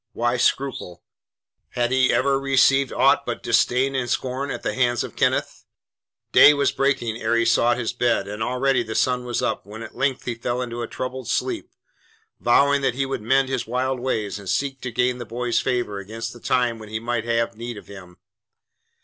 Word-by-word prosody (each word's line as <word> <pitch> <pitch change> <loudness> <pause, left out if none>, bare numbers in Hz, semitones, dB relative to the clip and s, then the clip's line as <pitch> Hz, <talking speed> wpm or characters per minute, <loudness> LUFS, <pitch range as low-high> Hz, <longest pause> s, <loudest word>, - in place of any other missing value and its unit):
Why 120 +1 0
scruple? 120 -10 -1 0.7
Had 120 0 0
he 130 -1 +3
ever 135 0 +2
received 135 0 +3
aught - - +3
but - - -5
disdain 130 +2 +2
and 125 -2 -2
scorn 130 +3 -2
at - - -5
the - - -1
hands 120 -2 +1
of - - -8
Kenneth. - - 0 0.7
Day 150 - +8
was 140 0 +2
breaking 135 -5 0
ere 120 - +1
he 115 0 +2
sought 115 +1 +3
his 120 -1 -2
bed, 120 -5 +1
and 105 +2 -6
already 125 +2 +1
the 110 -1 -5
sun 125 -1 +1
was 120 -1 -2
up - - -1
when 110 +3 -9
at 110 - -10
length 135 -2 -1
he 120 - -2
fell 120 +1 -3
into 120 -1 -4
a - - -3
troubled 130 -1 -5
sleep, - - -2 0.7
vowing 140 +4 +3
that 135 - 0
he 135 +1 0
would 135 -3 -4
mend 135 +4 +2
his 130 -3 -3
wild 130 +2 -1
ways 110 -6 -2
and 100 -2 -8
seek 135 -2 -1
to 125 - -4
gain 125 +2 0
the - - -4
boy's 120 +1 -1
favour 120 -5 -1
against 115 +3 -6
the 120 - -13
time 120 -1 0
when 110 -1 -10
he 110 +1 -3
might 115 0 -2
have 115 0 0
need 120 0 -6
of - - -11
him. 90 -3 -12
120 Hz, 200 wpm, -23 LUFS, 115-130 Hz, 0.7 s, Day